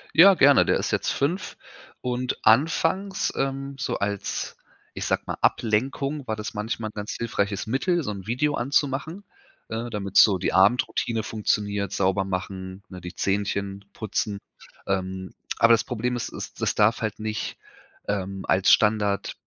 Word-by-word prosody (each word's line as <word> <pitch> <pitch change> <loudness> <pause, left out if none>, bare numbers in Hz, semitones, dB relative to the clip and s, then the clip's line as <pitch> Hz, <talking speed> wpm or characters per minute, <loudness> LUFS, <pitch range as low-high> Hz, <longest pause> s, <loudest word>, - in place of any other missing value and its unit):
Ja, 185 +4 +9
gerne, 140 -2 +6
der - - +2
ist - - -2
jetzt - - 0
5 165 +8 -1 0.4
und 125 0 -2
anfangs, 165 - +2
ähm, 135 0 -2
so 125 - -1
als, 100 -1 -3 0.4
ich - - -4
sage - - 0
mal, - - -3
Ablenkung 135 +5 0
war 110 - -1
das 105 -2 -6
manchmal 110 0 -3
'n - - -47
ganz 105 0 -5
hilfreiches 100 -4 -1
Mittel, 165 - 0
so 105 - -3
'n 100 0 -8
Video 145 +5 +1
an 130 0 -2
zu 145 0 +4
machen, 155 +8 -5 0.5
äh, 115 +2 -3
damit 100 -3 -5
so 100 -3 +7
die - - -1
Abendroutine 110 +3 +2
funktioniert, 105 -2 -1
sauber 95 0 +1
machen, 95 +1 -5
ne, 90 -1 -9
die 90 +1 -8
Zähnchen 100 0 -1
putzen. 105 -1 -2 0.5
Ähm, 95 -1 -3 0.2
aber 115 0 +6
das 115 - +3
Problem 125 +1 -2
ist, 120 - -4
es - - -6
es - - -13
es - - +1
darf 110 +3 +3
halt 110 -2 -2
nicht, 110 0 -4 0.5
ähm, 95 -1 -3
als 95 0 +4
Standard 105 -2 +2
110 Hz, 165 wpm, -25 LUFS, 100-130 Hz, 0.5 s, Ja